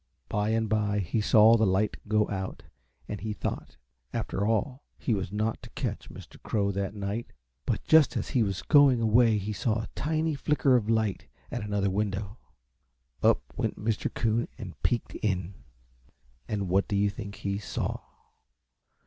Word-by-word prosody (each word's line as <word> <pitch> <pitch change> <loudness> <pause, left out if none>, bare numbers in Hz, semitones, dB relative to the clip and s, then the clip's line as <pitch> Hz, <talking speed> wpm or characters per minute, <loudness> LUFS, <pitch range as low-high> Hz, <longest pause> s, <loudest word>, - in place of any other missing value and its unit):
By 105 +1 0
and 110 0 +1
by 105 -1 +1
he 100 +3 0
saw 110 +1 +6
the 110 - +3
light 95 +3 +1
go 105 0 +2
out, 95 -1 -4 0.4
and 105 - -5
he 110 -1 -3
thought, 105 - -5 0.3
after 100 +2 -2
all, 125 +5 0
he 120 - 0
was 95 -3 -2
not 110 +2 -1
to - - -11
catch - - -4
Mr. - - -12
Crow 100 -2 0
that 100 +1 -3
night; 100 +3 -4 0.3
but 115 - 0
just 160 -2 +5
as - - -3
he 130 - +2
was 100 -3 -1
going 140 -4 +6
away 115 0 +4
he 105 +1 -3
saw 110 +3 0
a - - -8
tiny 155 +1 0
flicker 145 -2 +2
of 110 -3 +1
light 110 -3 0 0.2
at 120 - -3
another 100 -1 0
window. 100 +1 -2 0.8
Up - - +4
went - - -2
Mr. 110 0 -1
Coon 115 +1 0
and 95 -6 -7
peeked 120 -2 0
in. 95 -3 -1 0.9
And 100 -3 -2
what 95 +3 +2
do 100 - -1
you 100 0 +2
think 100 -1 -7
he 100 0 -3
saw? - - -3
105 Hz, 170 wpm, -28 LUFS, 100-115 Hz, 0.9 s, saw